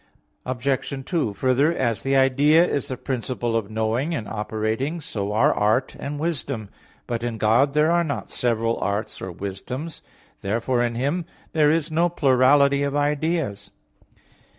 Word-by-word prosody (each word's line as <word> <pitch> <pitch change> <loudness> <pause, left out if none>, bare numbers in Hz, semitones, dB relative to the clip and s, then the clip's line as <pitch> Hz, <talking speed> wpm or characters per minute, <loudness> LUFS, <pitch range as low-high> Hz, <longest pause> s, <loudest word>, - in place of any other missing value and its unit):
Obj. 130 +1 -2
2: 155 - -1
Further, 130 +6 +2
as 120 -9 -1
the 135 0 0
idea 140 +5 +5
is 145 -5 -2
the 130 - -4
principle 120 -2 -2
of 110 -3 -1
knowing 110 +9 -1
and 110 -8 -4
operating, 110 +8 -2
so 105 -9 -4
are 110 - +3
art 110 +5 +1
and 145 +1 -4
wisdom. 140 -9 -3 0.4
But 115 -1 -3
in 120 -1 -3
God 120 +7 +3
there 155 +2 +4
are 170 0 +3
not 145 -4 -4
several 115 -1 0
arts 100 +2 -3
or 95 - -5
wisdoms. 110 - -6 0.4
Therefore 115 +5 0
in 120 -1 0
Him 145 +8 -1 0.3
there 150 -2 +4
is 160 0 +1
no 170 +2 +2
plurality 140 -1 +4
of 140 0 -1
ideas. 145 -7 -1
130 Hz, 150 wpm, -23 LUFS, 115-145 Hz, 0.4 s, idea